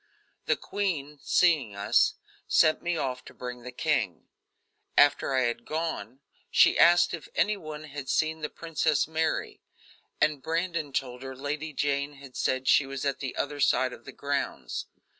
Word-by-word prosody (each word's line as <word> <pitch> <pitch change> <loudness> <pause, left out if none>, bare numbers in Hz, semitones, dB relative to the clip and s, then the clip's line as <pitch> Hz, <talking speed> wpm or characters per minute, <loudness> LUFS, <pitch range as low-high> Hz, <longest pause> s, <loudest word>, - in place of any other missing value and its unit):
The - - +4
queen, 150 -8 -3
seeing 150 - +3
us, 100 +1 +3 0.3
sent 155 - +4
me 175 -1 -1
off 130 -3 -2
to - - -13
bring 125 -1 -6
the 125 +1 -8
king. 125 - -1 0.7
After 145 -1 +4
I 130 - +3
had 120 -1 -1
gone, 155 -5 -4 0.3
she - - +5
asked 175 0 +6
if 165 -3 -6
any 210 +1 +2
one 155 -5 -8
had 145 -3 -7
seen 160 0 +1
the 150 - -2
Princess 160 -3 0
Mary, 160 0 -1 0.6
and 150 -2 +2
Brandon 165 0 -2
told 125 -2 -3
her 130 0 -7
Lady 150 +3 -4
Jane 140 0 -1
had 135 -2 -13
said 130 0 0
she 135 - +5
was 135 0 -4
at 140 - 0
the 135 -2 -4
other 145 0 -2
side 130 -2 +3
of 120 - -13
the - - -8
grounds. 140 0 -3
145 Hz, 165 wpm, -28 LUFS, 130-160 Hz, 0.7 s, asked